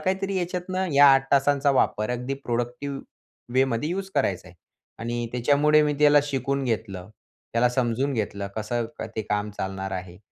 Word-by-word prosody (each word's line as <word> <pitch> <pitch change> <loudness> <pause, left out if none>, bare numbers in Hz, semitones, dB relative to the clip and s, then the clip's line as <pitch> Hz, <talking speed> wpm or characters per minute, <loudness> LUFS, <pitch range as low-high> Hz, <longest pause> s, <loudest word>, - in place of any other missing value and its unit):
काहीतरी 190 +3 -1
याच्यातनं 185 +1 -2
या 140 +1 +7
8 135 0 0
तासांचा 140 0 +3
वापर 110 -4 +1
अगदी 125 +2 -3
प्रोडक्टिव 125 +2 -3 0.6
वेमध्ये 130 +1 +1
यूज 190 +1 -3
करायचा 100 -10 0
आहे 90 - -18 0.4
आणि 120 +1 -3
त्याच्यामुळे 145 +5 +4
मी 150 0 +1
त्याला 150 0 +6
शिकून 140 -1 -2
घेतलं. 100 -5 -3 0.4
त्याला 120 +1 +3
समजून 125 +2 0
घेतलं, 100 -3 -3
कसं 115 +2 -2 0.3
ते 110 - -1
काम 105 0 -2
चालणार 95 -1 -5
आहे 90 -1 -6
130 Hz, 150 wpm, -25 LUFS, 110-145 Hz, 0.6 s, या